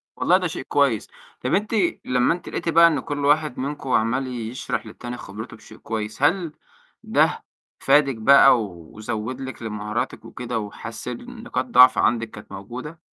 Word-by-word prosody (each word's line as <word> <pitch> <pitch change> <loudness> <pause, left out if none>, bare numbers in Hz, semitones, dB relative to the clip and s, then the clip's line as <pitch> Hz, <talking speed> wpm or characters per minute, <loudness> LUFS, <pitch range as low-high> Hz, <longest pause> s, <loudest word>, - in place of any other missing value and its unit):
والله - - +3
ده - - -1
شيء - - -6
كويس. - - +1 0.3
طَب - - -1
أنتِ 210 +3 0 0.3
لمّا 125 +4 +2
أنتِ 175 -1 -8
لقيتِ 165 - -3
بقى 170 +1 +7
إن 150 -4 +1
كل 145 +1 -3
واحد 150 -2 +2
منكم 140 0 -4
عَمّال 125 +4 +1
يشرح 120 0 -4
للتاني 120 0 -8
خبرته 110 +3 -9
بشيء - - -15
كويس، 110 +2 -5
هل 170 +1 +2 0.5
ده - - +1 0.4
فادِك 140 -2 +3
بقى 120 0 +6
وزوّد 110 +7 -6
لِك 130 -3 -7
لمهاراتِك 105 -1 -4
وكده - - -4
وحسِّن 120 - -7
نقاط 245 - -2
ضعف 130 - +6
عندكِ 115 -1 +1
كانت 105 - -12
موجودة؟ 125 +11 -8
125 Hz, 155 wpm, -23 LUFS, 110-145 Hz, 0.5 s, بقى